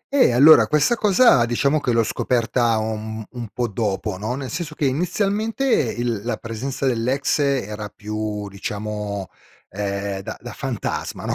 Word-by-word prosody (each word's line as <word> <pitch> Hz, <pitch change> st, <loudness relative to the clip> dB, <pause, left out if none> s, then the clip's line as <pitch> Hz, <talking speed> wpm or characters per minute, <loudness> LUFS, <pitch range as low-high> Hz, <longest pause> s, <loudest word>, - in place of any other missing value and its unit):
Eh, 255 Hz, -, +5 dB
allora 125 Hz, -2 st, +7 dB
questa 150 Hz, -, +3 dB
cosa 210 Hz, -, +5 dB
diciamo 140 Hz, +6 st, +1 dB
che 125 Hz, -, 0 dB
l'ho 115 Hz, -1 st, +3 dB
scoperta 120 Hz, 0 st, +1 dB
un 110 Hz, 0 st, -4 dB
un 120 Hz, -2 st, -6 dB
po' 120 Hz, -1 st, -1 dB
dopo, 105 Hz, -1 st, -2 dB
no, 110 Hz, +5 st, -2 dB
nel 135 Hz, -1 st, -5 dB
senso 155 Hz, -1 st, -4 dB
che 150 Hz, -, -1 dB
inizialmente 200 Hz, -, 0 dB
il 120 Hz, -, 0 dB
la 120 Hz, -, -2 dB
presenza 125 Hz, +4 st, -4 dB
dell'ex 130 Hz, +4 st, +1 dB
era 105 Hz, -7 st, -1 dB
più, 105 Hz, 0 st, -4 dB
diciamo, 100 Hz, 0 st, -5 dB, 0.4 s
ehm, 100 Hz, 0 st, -3 dB
da -, -, -7 dB
da -, -, -8 dB
fantasma, -, -, -4 dB
no, -, -, 0 dB
120 Hz, 155 wpm, -22 LUFS, 105-140 Hz, 0.4 s, allora